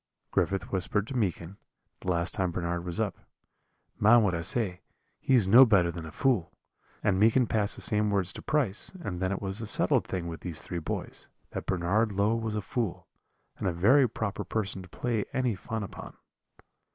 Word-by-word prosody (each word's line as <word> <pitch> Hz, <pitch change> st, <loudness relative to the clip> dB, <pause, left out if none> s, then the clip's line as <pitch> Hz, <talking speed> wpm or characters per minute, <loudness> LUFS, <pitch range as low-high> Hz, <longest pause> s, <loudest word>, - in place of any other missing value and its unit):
"Griffith 95 Hz, -1 st, 0 dB
whispered 100 Hz, +2 st, 0 dB
to 130 Hz, -, -7 dB
Meekin, 95 Hz, -4 st, -2 dB, 0.4 s
the 90 Hz, -, -2 dB
last 85 Hz, 0 st, 0 dB
time 95 Hz, -2 st, 0 dB
Bernard 85 Hz, 0 st, -3 dB
was 85 Hz, -1 st, -4 dB
up, -, -, -2 dB, 0.8 s
'Mind 115 Hz, +2 st, +6 dB
what 100 Hz, -3 st, +1 dB
I 85 Hz, -, -2 dB
say, 100 Hz, -3 st, +1 dB, 0.4 s
he 135 Hz, -, +2 dB
is 110 Hz, -7 st, +3 dB
no 120 Hz, +7 st, +9 dB
better 100 Hz, -8 st, +4 dB
than 85 Hz, -1 st, -7 dB
a -, -, -9 dB
fool;' 110 Hz, -, 0 dB, 0.5 s
and 95 Hz, -2 st, +2 dB
Meekin 115 Hz, +4 st, +4 dB
passed 105 Hz, -2 st, +1 dB
the -, -, -2 dB
same 105 Hz, -1 st, +2 dB
words 100 Hz, -3 st, +1 dB
to -, -, -8 dB
Price, 135 Hz, -11 st, 0 dB
and 90 Hz, -, -4 dB
then 95 Hz, 0 st, 0 dB
it 100 Hz, -, -3 dB
was 95 Hz, +3 st, -1 dB
a 110 Hz, -, -2 dB
settled -, -, +2 dB
thing 90 Hz, -2 st, -3 dB
with 85 Hz, -1 st, -6 dB
these 85 Hz, -3 st, -2 dB
three 85 Hz, -, -5 dB
boys, 80 Hz, -, -6 dB, 0.2 s
that -, -, -6 dB
Bernard 95 Hz, +5 st, +1 dB
Low 100 Hz, +3 st, +2 dB
was 110 Hz, -2 st, -3 dB
a 105 Hz, -, -1 dB
fool, 115 Hz, -7 st, -3 dB, 0.5 s
and -, -, -2 dB
a -, -, +2 dB
very 120 Hz, +10 st, +4 dB
proper 105 Hz, -2 st, -3 dB
person 100 Hz, 0 st, -3 dB
to 90 Hz, -, -13 dB
play 115 Hz, +1 st, -2 dB
any 130 Hz, -3 st, +1 dB
fun 110 Hz, +3 st, -5 dB
upon. 100 Hz, -, -9 dB
100 Hz, 200 wpm, -28 LUFS, 90-110 Hz, 0.8 s, no